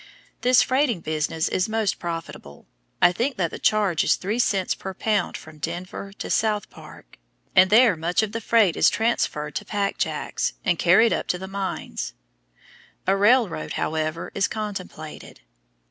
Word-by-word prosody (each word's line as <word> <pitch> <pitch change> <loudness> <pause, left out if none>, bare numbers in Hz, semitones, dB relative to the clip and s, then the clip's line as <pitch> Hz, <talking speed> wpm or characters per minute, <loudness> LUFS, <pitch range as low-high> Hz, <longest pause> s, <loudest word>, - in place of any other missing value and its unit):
This 250 0 +5
freighting 260 - +1
business 155 +1 -1
is 185 +3 0
most 220 -2 0
profitable. 165 - -7 0.4
I 175 - +7
think 240 +7 -2
that 170 -4 0
the - - -7
charge 205 -6 +2
is - - +3
three 210 +5 -3
cents 195 -5 +1
per 190 -1 -7
pound 210 -2 0
from 155 -1 -14
Denver 180 +4 -5
to - - -7
South 215 -2 0
Park, - - -14 0.4
and 185 +1 +7
there 225 -1 +6
much 170 +6 0
of 210 - -3
the 230 +1 -4
freight 215 -6 +3
is - - +5
transferred 150 -10 -1
to - - -5
"pack 200 -1 -2
jacks" - - -2
and - - +1
carried 230 +1 +5
up - - -2
to 180 - 0
the 190 +1 -7
mines. 195 0 -4 0.9
A 190 - +3
railroad, 205 -5 +2
however, 155 +1 -2
is 200 - +1
contemplated. 195 -7 -7
195 Hz, 160 wpm, -24 LUFS, 170-220 Hz, 0.9 s, I